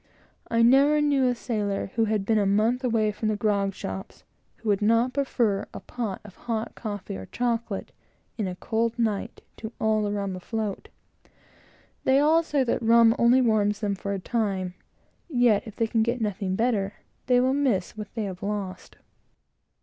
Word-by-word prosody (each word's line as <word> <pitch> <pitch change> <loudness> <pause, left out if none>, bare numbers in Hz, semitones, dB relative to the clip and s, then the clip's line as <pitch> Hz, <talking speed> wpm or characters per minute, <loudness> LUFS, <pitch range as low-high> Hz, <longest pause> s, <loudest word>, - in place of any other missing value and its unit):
I 230 0 +3
never 275 +5 +5
knew 285 -3 +3
a 245 - +1
sailor, 235 -1 -3
in 200 - -1
my 195 - -1
life, 195 - -5
who 225 -1 +2
would 210 -2 -1 2.5
not 230 +4 +3
prefer 240 -7 0
a - - -4
pot 225 -6 -5
of 195 - -12
hot 225 -2 -3
coffee 205 - -6
or 95 0 -8
chocolate, 235 -4 -2 0.4
in 210 -4 -2
a 180 - -4
cold 225 +4 -1
night, 225 -1 -2
to 220 0 -7
all 220 -1 +2
the 205 -1 -1
rum 200 -2 -2
afloat. 210 +2 -4 1.1
They 265 - +4
all 310 +3 +4
say 295 -4 0
that 240 - -1
rum 230 0 +5
only 240 +2 +5
warms 210 -2 +2
them 205 -2 0
for 200 +1 -4
a 195 - -2
time; 195 -4 -2 0.6
yet, 240 -7 +3
if 215 - -9
they 230 - +1
can 225 0 +1
get 235 +2 0
nothing 200 -3 -2
better, 210 -3 0 0.3
they 250 -1 +5
will 260 +1 +2
miss 255 -12 0
what 210 -1 -7
they 225 - -1
have 185 -3 -6
lost. 200 -3 -5
220 Hz, 160 wpm, -26 LUFS, 200-245 Hz, 2.5 s, never